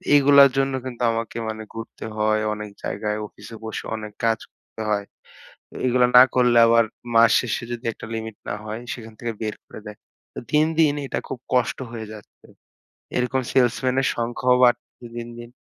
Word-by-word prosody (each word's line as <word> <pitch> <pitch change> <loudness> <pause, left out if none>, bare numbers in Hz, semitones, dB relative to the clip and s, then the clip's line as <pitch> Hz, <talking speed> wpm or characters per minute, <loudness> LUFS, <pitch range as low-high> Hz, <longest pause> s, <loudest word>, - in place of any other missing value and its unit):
এগুলোর 140 -1 +7
জন্য 135 0 +1
কিন্তু 125 -2 -7
আমাকে 115 0 -4
মানে 110 0 -5
ঘুরতে 115 0 -8
হয় 110 0 +2
অনেক 105 0 -6
জায়গায়, 105 0 -2
অফিসে 105 +2 -12
বসে 110 - -5
অনেক 105 -1 -7
কাজ 115 -1 +2
করতে 110 - -13
হয়। 100 -1 0 0.6
তো - - -18
এইগুলা 125 0 +4
না 125 - +11
করলে 125 -1 +4
আবার 115 0 +5 0.3
মাস 115 -1 +7
শেষে 120 -1 -2
যদি 120 +1 -6
একটা - - -10
লিমিট 110 -1 -5
না - - -2
হয়, 110 +1 -5
সেখান 115 -2 -10
থেকে 120 -1 -3
বের 110 -1 -2
করে - - -11
দেয়। 105 -1 -9 0.4
তো - - -6
দিন, 150 0 +4
দিন 150 -3 +5
এটা - - -2
খুব 130 - -6
কষ্ট 125 -1 +2
হয়ে 115 -2 -6
যাচ্ছে। 105 -1 -15 0.7
এরকম 125 +2 +1
সেলসম্যানের 130 +1 +2
সংখ্যাও 120 +2 +1
বাড়তেছে 120 0 0
দিন, 120 0 -5
দিন। 120 0 -10
115 Hz, 175 wpm, -23 LUFS, 110-125 Hz, 0.7 s, না